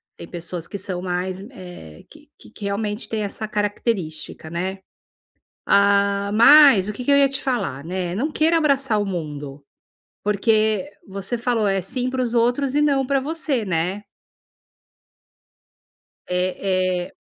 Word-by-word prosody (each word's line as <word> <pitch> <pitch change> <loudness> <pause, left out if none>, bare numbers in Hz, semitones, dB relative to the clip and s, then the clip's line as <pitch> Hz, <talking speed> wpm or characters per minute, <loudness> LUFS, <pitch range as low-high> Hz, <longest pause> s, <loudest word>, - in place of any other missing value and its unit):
Tem 170 - -10
pessoas 170 0 -6
que 200 - -6
são 185 -2 -4
mais, 185 +1 -3
eh, 180 - -11
que - - -18 0.2
que 205 - -8
realmente 205 +2 -3
tem 220 -1 -2
essa 215 +2 -4
característica, 205 -7 -3
né. 185 +3 -3 0.9
Ah, 200 0 +3
mas 235 -4 +7
o 210 - -2
que 250 +4 -7
que 285 - 0
eu - - +6
ia 275 - +5
te 275 0 -2
falar, 140 - -2
né. 180 0 -3
Não 275 +10 -1
queira 325 +2 +2
abraçar 275 -8 +2
o 205 - -1
mundo, 150 -6 -6 0.6
porque 215 +4 +1 0.2
você 195 +5 -4
falou, 230 -3 0
é 195 -1 +1
sim 250 +7 -2
para 260 0 -2
os 240 -2 -1
outros 245 +3 +1
e 295 - +3
não 275 -3 +2
pra 275 0 +1
você, 280 -4 -2
né. 185 +3 -1 2.2
Eh 180 0 -1
eh. 185 -2 -1
200 Hz, 150 wpm, -22 LUFS, 185-245 Hz, 2.2 s, mas